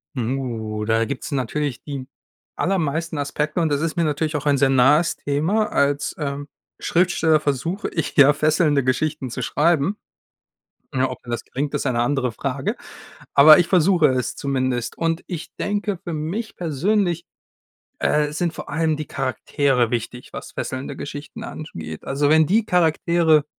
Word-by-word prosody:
Hm, 125 +2 -1
oh, 110 -4 -4
da 115 +1 +2
gibt 130 +2 -4
es - - -6
natürlich 135 0 -2
die 140 -3 -6 0.5
allermeisten 165 -3 -1
Aspekte 150 +3 -2
und 165 - +2
das 145 -1 0
ist 165 0 -2
mir 170 - +2
natürlich 155 +1 -1
auch 145 - -6
ein 145 -1 +3
sehr 135 0 +3
nahes 135 +6 +4
Thema. 170 +10 0
Als, 140 0 +1
ähm, 145 -1 -4 0.3
Schriftsteller 165 -3 +2
versuche 155 +7 -2
ich 160 - -3
ja, 140 0 +8
fesselnde 150 -1 +2
Geschichten 140 +1 -1
zu 125 - -5
schreiben. 150 - +1 1.0
Ne, 130 0 +1
ob 130 - -6
das 120 -1 -4
gelingt, 140 +2 -3
ist 145 - -1
eine 120 -3 +1
andere 125 0 0
Frage. 135 +3 -3 0.6
Aber 155 +2 +9
ich 175 - +3
versuche 180 -2 +4
es 130 -2 -1
zumindest. 130 -3 -1
Und, 165 0 -1
ich 165 -2 -7
denke, 205 -2 -2
für 175 - -5
mich 175 +9 -4
persönlich, 175 +2 0 0.8
äh, 150 0 +1
sind 170 +1 -1
vor - - -8
allem 160 0 0
die 155 - -4
Charaktere 130 -2 0
wichtig, 120 +1 -4
was - - -7
fesselnde 130 +1 -5
Geschichten 145 +11 -7
ansch 155 -8 -8
geht. 80 -1 -7
Also, 145 +2 0
wenn 160 +1 +5
die 215 +7 +2
Charaktere 165 -3 +3
150 Hz, 165 wpm, -22 LUFS, 130-165 Hz, 1.0 s, Aber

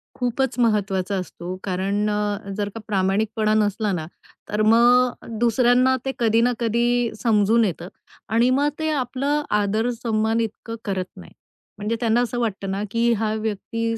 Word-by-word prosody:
खूपच 250 +1 -1
महत्वाचा 200 -4 +1
असतो. 180 -1 -6
कारण 200 +2 -1
अ, 210 -1 -2
जर 205 -1 -1
का - - -5
प्रामाणिकपणा 210 +2 +1
नसला 210 0 +1
ना, 160 -3 -3 0.4
तर 210 +1 -1
मग 245 +1 +4
दुसऱ्यांना 245 +2 +3
ते 270 - 0
कधी 225 -1 +3
ना 245 +1 +2
कधी 235 +1 +1
समजून 225 0 +3
येतं 175 -2 -4 0.4
आणि 230 +3 +3
मग 280 +3 +2
ते 315 0 0
आपलं 280 +2 -1 0.2
आदर 215 +4 0
सम्मान 220 0 +1
इतकं 225 +1 -5
करत 190 -2 -2
नाहीत. 85 - -13 0.4
म्हणजे 210 +3 -2
त्यांना 230 0 +2
असं 245 0 -2
वाटतं 200 -4 -2
ना, 195 +2 -2
की 235 +1 +2
हा 215 -1 -1
व्यक्ती 225 +1 -2
220 Hz, 155 wpm, -22 LUFS, 205-240 Hz, 0.4 s, मग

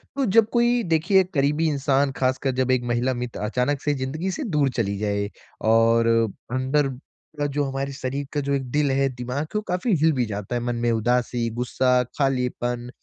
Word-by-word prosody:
तो 275 -1 +1
जब 220 +1 +4
कोई 240 0 +3
देखिए 185 +5 +4
करीबी 150 +2 +2
इंसान 140 -1 +1
खासकर 130 +1 +1
जब 130 0 +1
एक 130 -1 +2
महिला 125 +2 +1
मित्र 120 -1 -5
अचानक 125 +7 -1
से 145 - +1
ज़िंदगी 145 +7 -3
से 295 - -4
दूर 150 - +1
चली 100 -4 0
जाए 100 0 -1 0.4
और 115 +1 +4 0.4
अंदर 130 +3 +1 0.5
का 145 - +1
जो 145 - +2
हमारे 135 0 -3
शरीर 135 +1 -4
का 150 - 0
जो 140 0 -1
एक 135 -1 0
दिल 145 0 +2
है, 135 +1 +2
दिमाग 125 +3 -4
कि 185 - -4
वो - - 0
काफ़ी 180 +6 0
हिल 160 +1 +5
भी 125 -3 0
जाता 105 +2 -4
है, 120 - -1
मन 120 0 -1
में 120 - +2
उदासी, 120 +1 0
गुस्सा, 125 +1 +1
खालीपन, 125 -3 -1
135 Hz, 195 wpm, -24 LUFS, 120-150 Hz, 0.5 s, हिल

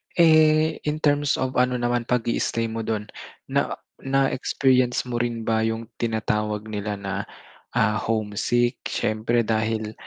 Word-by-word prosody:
Eh, 155 -1 +5
in 155 +1 -2
terms 145 -1 +3
of 130 0 -2
ano 125 0 +2
naman 120 -1 -1
pag-istay 115 -1 0
mo 115 - -4
dun. 110 -1 -3 0.4
Na - - +1 0.2
na 135 0 +1
experience 130 -1 +2
mo 120 - -1
rin 120 -1 -1
ba 110 0 +1
yung 115 0 -3
tinatawag 105 -2 -1
nila 105 0 -3
na, 100 0 -4 0.5
ah, 105 -2 +2
homesick 115 +2 0
syempre 110 +2 0
dahil 110 0 -1
115 Hz, 135 wpm, -24 LUFS, 110-130 Hz, 0.5 s, Eh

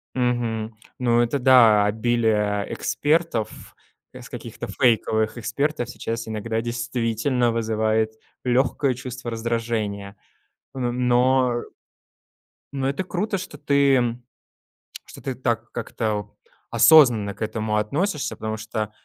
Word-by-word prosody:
Мгм. 115 -3 -1 0.2
Ну, 120 -1 +3
это 120 +4 0
да, 115 -5 +6
обилие 105 -2 +1
экспертов, 150 - -1 0.4
с - - -11
каких-то - - -7
фейковых 110 -2 +1
экспертов 125 +2 -2
сейчас 115 -2 -5
иногда 110 +1 -2
действительно 120 +1 0
вызывает 110 -1 0 0.3
легкое 130 +2 +1
чувство 125 -1 -7
раздражения. 110 -3 -3 0.6
М, 125 -1 -1
но 125 +1 +3
э - - -9 1.1
Но 135 -1 -1
это 140 +7 -2
круто, 195 +3 -2
что 180 -5 -8
ты 140 -4 +2 0.9
что - - -13
ты 130 -2 -4
так 120 -2 -2
как-то 105 -3 -3 0.4
осознанно 120 -11 +6
к - - -22
этому 110 0 -1
относишься, 150 - -1
потому 110 0 -4
что 110 0 -4
120 Hz, 110 wpm, -23 LUFS, 110-130 Hz, 1.1 s, да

